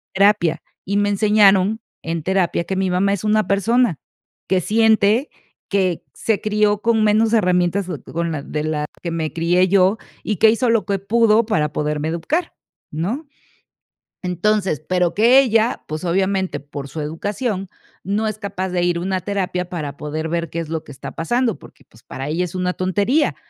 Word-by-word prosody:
terapia, 190 Hz, -5 st, +3 dB, 0.2 s
y 200 Hz, +2 st, -1 dB
me 205 Hz, 0 st, +2 dB
enseñaron 205 Hz, 0 st, +4 dB, 0.2 s
en 165 Hz, -1 st, -3 dB
terapia 185 Hz, -1 st, +1 dB
que 190 Hz, +3 st, -3 dB
mi 190 Hz, 0 st, 0 dB
mamá 190 Hz, +2 st, +2 dB
es 200 Hz, -, -3 dB
una 215 Hz, 0 st, +2 dB
persona 200 Hz, -, +2 dB, 0.5 s
que 190 Hz, -1 st, +2 dB
siente, 220 Hz, -, +3 dB, 0.4 s
que 185 Hz, -4 st, 0 dB
se 220 Hz, -3 st, -1 dB
crió 210 Hz, -1 st, +1 dB
con 230 Hz, -1 st, +2 dB
menos 215 Hz, +1 st, +3 dB
herramientas 180 Hz, -2 st, +2 dB, 0.3 s
con 170 Hz, 0 st, -1 dB
la 150 Hz, -, -3 dB
de 150 Hz, 0 st, -3 dB
las 150 Hz, -1 st, -2 dB, 0.2 s
que 170 Hz, -, -2 dB
me 160 Hz, -2 st, -2 dB
crié 175 Hz, +3 st, +2 dB
yo, 190 Hz, +2 st, +3 dB, 0.3 s
y 215 Hz, -, -1 dB
que 220 Hz, -, +6 dB
hizo 230 Hz, +2 st, +1 dB
lo 230 Hz, -2 st, +2 dB
que 200 Hz, -1 st, -1 dB
pudo 225 Hz, +2 st, +3 dB
para 155 Hz, -10 st, 0 dB
poderme 150 Hz, +1 st, -1 dB
educar, 290 Hz, -, -2 dB, 0.4 s
¿no? 210 Hz, -, -3 dB, 1.0 s
Entonces, 180 Hz, -2 st, 0 dB
pero 180 Hz, -2 st, +1 dB
que 240 Hz, +6 st, +6 dB
ella 230 Hz, -2 st, +1 dB
pues, 155 Hz, +3 st, -5 dB
obviamente, 190 Hz, +2 st, 0 dB
por 140 Hz, -1 st, -8 dB
su 155 Hz, +3 st, -6 dB
educación, 195 Hz, -, -3 dB, 0.4 s
no 205 Hz, +3 st, -1 dB
es 215 Hz, -, -5 dB
capaz 190 Hz, -2 st, -4 dB
de 180 Hz, -1 st, 0 dB
ir 175 Hz, -1 st, +1 dB
a -, -, -4 dB
una 190 Hz, 0 st, -1 dB
terapia 180 Hz, -2 st, -2 dB
para 150 Hz, -5 st, -5 dB
poder 155 Hz, +2 st, -4 dB
ver 170 Hz, -1 st, -2 dB
qué 165 Hz, -, -5 dB
es 165 Hz, -, -6 dB
lo 160 Hz, -1 st, -2 dB
que -, -, -14 dB
está 130 Hz, -, -8 dB
pasando, 240 Hz, +8 st, 0 dB
porque, 145 Hz, -, -17 dB
pues, 115 Hz, -, -22 dB
para 135 Hz, +2 st, -6 dB
ella 170 Hz, +4 st, 0 dB
es 180 Hz, 0 st, -7 dB
una 180 Hz, 0 st, 0 dB
tontería. 205 Hz, -, +1 dB
190 Hz, 180 wpm, -20 LUFS, 170-215 Hz, 1.0 s, que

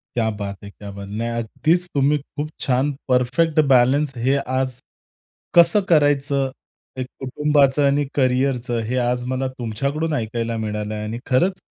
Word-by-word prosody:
क्या 115 Hz, -2 st, +1 dB
बात 100 Hz, -1 st, -4 dB
है! 100 Hz, -, -8 dB
क्या 100 Hz, 0 st, -10 dB
बात! 100 Hz, 0 st, -8 dB
नाही 115 Hz, +3 st, -2 dB
अगदीच 160 Hz, +10 st, 0 dB
तुम्ही 145 Hz, +1 st, +3 dB
खूप 145 Hz, +2 st, -6 dB
छान 135 Hz, +2 st, +1 dB, 0.2 s
परफेक्ट 130 Hz, +6 st, +2 dB
बॅलन्स 135 Hz, +3 st, +4 dB
हे 130 Hz, +4 st, +2 dB
आज 130 Hz, -2 st, -2 dB, 0.8 s
कसं 175 Hz, +5 st, +6 dB
करायचं 140 Hz, -3 st, +2 dB, 0.5 s
हे 130 Hz, -, -1 dB
कुटुंबाचं 140 Hz, +2 st, +1 dB
आणि 145 Hz, +1 st, +2 dB
करिअरचं, 125 Hz, -2 st, +1 dB
हे 115 Hz, +3 st, -3 dB
आज 125 Hz, 0 st, 0 dB
मला 130 Hz, +1 st, -1 dB
तुमच्याकडून 140 Hz, +8 st, -2 dB
ऐकायला 115 Hz, -2 st, -2 dB
मिळालं 105 Hz, -1 st, -3 dB
आणि 105 Hz, +2 st, -4 dB
खरंच 180 Hz, +9 st, +1 dB
130 Hz, 145 wpm, -21 LUFS, 115-145 Hz, 0.8 s, कसं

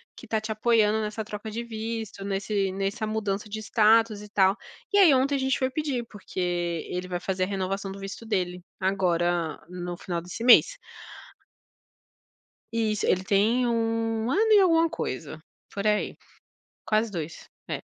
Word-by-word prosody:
que 240 Hz, -, -12 dB
tá 220 Hz, 0 st, 0 dB
te 220 Hz, +1 st, -5 dB
apoiando 220 Hz, -1 st, +3 dB
nessa 215 Hz, 0 st, -4 dB
troca 215 Hz, 0 st, -6 dB
de 230 Hz, +2 st, -3 dB
visto, 225 Hz, -2 st, -5 dB
nesse 195 Hz, 0 st, -1 dB
nessa 195 Hz, +3 st, -2 dB
mudança 210 Hz, -1 st, -2 dB
de 215 Hz, +1 st, -4 dB
status" 220 Hz, 0 st, +3 dB
e 210 Hz, -, -11 dB
tal. 195 Hz, -1 st, +3 dB, 0.4 s
E -, -, +4 dB
aí, 345 Hz, -7 st, +8 dB
ontem 270 Hz, +2 st, +2 dB
a -, -, +1 dB
gente 265 Hz, 0 st, 0 dB
foi 260 Hz, -, +1 dB
pedir, 265 Hz, -4 st, -2 dB
porque 205 Hz, -2 st, -8 dB, 0.5 s
ele 180 Hz, 0 st, -3 dB
vai 175 Hz, -, -2 dB
fazer 185 Hz, 0 st, -1 dB
a -, -, 0 dB
renovação 195 Hz, 0 st, -3 dB
do 195 Hz, -, -8 dB
visto 195 Hz, +3 st, -7 dB
dele 180 Hz, -4 st, -2 dB, 0.2 s
agora, 175 Hz, -4 st, 0 dB
no 175 Hz, -1 st, -5 dB
final 170 Hz, -2 st, -4 dB
desse 185 Hz, +7 st, -7 dB
mês. -, -, +7 dB, 2.0 s
Isso, 215 Hz, -2 st, 0 dB
ele 185 Hz, +1 st, +2 dB
tem 220 Hz, +6 st, +2 dB
um 225 Hz, 0 st, 0 dB
ano 440 Hz, +4 st, +3 dB
e 420 Hz, -, +8 dB
alguma 330 Hz, -3 st, +4 dB
coisa. -, -, -5 dB, 0.3 s
Por 200 Hz, +1 st, -4 dB
aí, 210 Hz, 0 st, +1 dB, 0.7 s
quase 215 Hz, 0 st, +1 dB
2. 165 Hz, -3 st, -6 dB, 0.2 s
É. -, -, -3 dB
215 Hz, 165 wpm, -26 LUFS, 195-230 Hz, 2.0 s, aí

